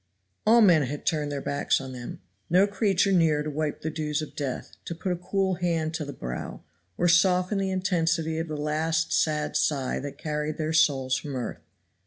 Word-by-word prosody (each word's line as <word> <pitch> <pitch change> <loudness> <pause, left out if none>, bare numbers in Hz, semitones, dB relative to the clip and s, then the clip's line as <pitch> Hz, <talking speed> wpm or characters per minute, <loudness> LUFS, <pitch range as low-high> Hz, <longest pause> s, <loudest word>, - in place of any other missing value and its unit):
All 230 +2 +7
men 175 -7 +6
had 145 +2 -4
turned 150 -2 0
their 140 -1 -4
backs 140 - +1
on 135 -1 -7
them, 120 -3 -8 0.3
no 185 +3 +5
creature 200 -1 +1
near 160 -5 +3
to 150 - -4
wipe 150 0 -2
the 160 - -3
dews 150 -1 -2
of 155 - -9
death, 135 -4 -4
to 170 - -5
put 180 +3 -3
a - - +1
cool 190 +2 0
hand 165 -2 0
to 160 -2 -3
the 145 - -6
brow, 60 - -6 0.3
or 175 - +2
soften 180 +3 +3
the 195 -1 0
intensity 165 -4 0
of 165 - -3
the 155 -1 -4
last 160 +2 0
sad 150 -1 +1
sigh 135 -4 0
that 145 0 -7
carried 150 0 -3
their 155 0 -2
souls 135 -5 +3
from 140 +1 -6
earth. 125 - -4
155 Hz, 200 wpm, -26 LUFS, 150-175 Hz, 0.3 s, All